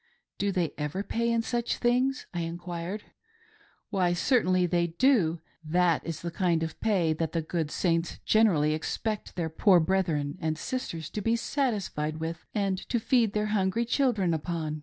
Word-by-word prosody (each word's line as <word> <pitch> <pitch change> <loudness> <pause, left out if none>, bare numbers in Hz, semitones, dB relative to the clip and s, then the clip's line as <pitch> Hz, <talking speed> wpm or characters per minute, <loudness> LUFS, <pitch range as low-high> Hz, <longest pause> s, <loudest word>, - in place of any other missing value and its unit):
" - - -58
Do 200 0 +1
they 175 -6 -1
ever 150 +7 -2
pay 235 +2 0
in 230 0 +1
such 240 0 -1
things 255 +2 +1
.'" - - -46
I 175 - -2
enquired. 175 +4 -5 0.9
"Why 180 -4 +2
certainly 185 -3 +2
ttey 170 -1 0
do. 190 - +3 0.2
That 170 +1 +2
is 165 -1 -5
the 170 - -3
kind 170 -2 +1
of 160 - -5
pay 185 -8 +2
that 160 0 -3
the 165 - +1
good 160 -1 -2
Saints 165 0 0
generally 170 -9 +4
expect 210 +7 -3
their 170 -2 -1
poor 180 +2 +5
brethren 160 -4 0
and 160 -1 -1
sisters 170 - -4
to 210 - -3
be 225 +3 +2
satisfied 205 - -1
with, 165 +1 -5
and 195 -3 0
to 240 - +1
feed 225 -2 +2
their 210 0 0
hungry 205 +3 +1
children 230 - +1
upon. 155 -1 -3
180 Hz, 175 wpm, -28 LUFS, 165-215 Hz, 0.9 s, poor